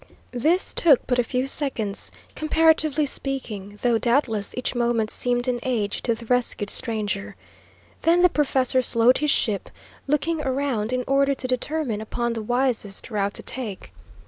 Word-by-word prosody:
This 315 +10 +1
took 295 -7 +4
but 250 -1 0
a - - +4
few 250 +2 -1
seconds, 250 -8 0 0.2
comparatively 310 -1 +2
speaking, 215 -8 -5
though, 235 -2 +3
doubtless, 235 -4 0
each 250 - -2
moment 235 -3 0
seemed 245 0 0
an 245 -1 0
age 225 -6 -2
to 230 - 0
the 230 +1 -11
rescued 240 -4 0
stranger. 210 -4 -2 0.7
Then 345 +2 +3
the - - +8
professor 265 -5 +2
slowed 240 +1 +4
his 300 - 0
ship, 215 -7 0 0.4
looking 300 +3 0
around 260 -5 -1
in 255 0 -1
order 275 0 +2
to 255 - -3
determine 255 -3 -2
upon 235 +2 -2
the 225 - -4
wisest 240 -2 -1
route 200 -1 -1
to - - -4
take. 210 - -6
250 Hz, 155 wpm, -23 LUFS, 220-275 Hz, 0.7 s, the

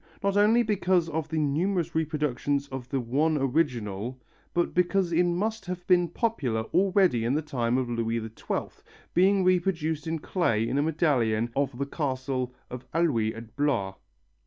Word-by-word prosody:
Not 200 0 +1
only 215 +4 +5
because 185 -5 +1
of 160 0 -3
the 160 - -2
numerous 165 +4 0
reproductions 145 -3 -1
of 130 -2 -7
the 135 - 0
one 145 +6 +1
original 125 -5 -1 0.3
but 175 - 0
because 180 0 +1
it 170 +2 +4
must 195 +4 -1
have 180 -1 -5
been 175 -1 +4
popular 150 - -1
already 185 - +3
in 120 +4 +1
the 155 - 0
time 125 -5 0
of 130 -1 0
Louis 115 -1 -1
XII, 110 0 -5 0.3
being 190 +2 +4
reproduced 170 -4 +1
in 160 0 -1
clay 120 - 0
in 135 - 0
a - - +3
medallion 125 -8 +1
of 140 -3 -1
the 140 - -1
castle 130 -3 -2 0.2
of 125 0 -8
Alluye 120 -10 +1
at 115 0 -11
Blois. 130 -10 0
150 Hz, 160 wpm, -27 LUFS, 125-175 Hz, 0.3 s, only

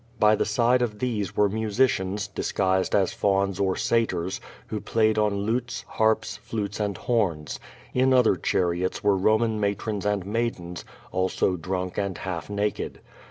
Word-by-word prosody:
By 105 0 +6
the - - 0
side 120 +3 +3
of 110 -4 -1
these 105 -6 -2
were 105 - +5
musicians, 105 -2 0
disguised 95 -2 0
as 95 -3 +2
fa\ms 100 -1 +1
or 95 -2 +1
Satyrs, 95 -6 0 0.2
who 105 - -4
played 110 -1 +2
on 105 -1 +1
lutes, 120 +2 -2
harps, 110 0 +1
flutes 100 -3 -4
and 100 -3 -1
horns. 90 -11 -1 0.3
In 130 +1 +3
other 125 -6 +5
char 90 0 +1
iots 90 +2 -2
were 100 -1 +4
Roman 110 +3 +2
matrons 100 0 -1
and 105 -2 0
maidens, 100 -6 -3 0.3
also 95 0 +1
drunk 90 +2 -3
and 100 -3 -2
half 90 -3 -5
naked. 105 0 -2
105 Hz, 155 wpm, -26 LUFS, 95-110 Hz, 0.3 s, By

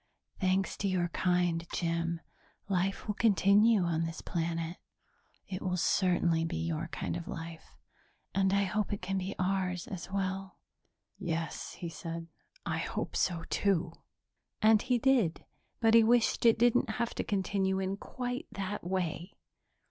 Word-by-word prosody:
Thanks 190 0 +1
to 200 - -1
your 180 -2 +1
kind, 175 -2 +1
Jim, 170 -1 -1 0.5
life 195 0 0
will 210 - -1
continue 210 0 +4
on 165 -2 0
this 165 0 -4
planet; 165 0 -2 0.7
it 185 -1 -5
will 180 -1 -1
certainly 175 -2 +2
be 165 +1 -2
your 165 0 -2
kind 165 - -4
of 170 -1 -5
life 165 0 -8 0.6
and 190 0 +2
I 200 +1 +3
hope 210 +1 -1
it 205 - -3
can 195 +1 -1
be 190 +2 -4
ours 185 -1 0
as 185 -2 -7
well." 195 0 -2 0.6
"Yes," 165 -3 -3
he 175 - -6
said. 165 0 -6 0.4
"I - - -1
hope - - -3
so, 170 -3 +1
too." 180 -4 +1 0.7
And 215 -1 +5
he 250 -1 +2
did, 240 -9 +2 0.4
but 225 -1 +4
he 230 0 +8
wished 235 +1 +3
it 230 - +6
didn't 240 +1 +3
have 230 +2 -1
to - - -2
continue 190 -1 0
in 190 0 -1
quite 245 +3 -4
that 200 +1 -4
way. 175 0 -2
185 Hz, 150 wpm, -31 LUFS, 170-205 Hz, 0.7 s, he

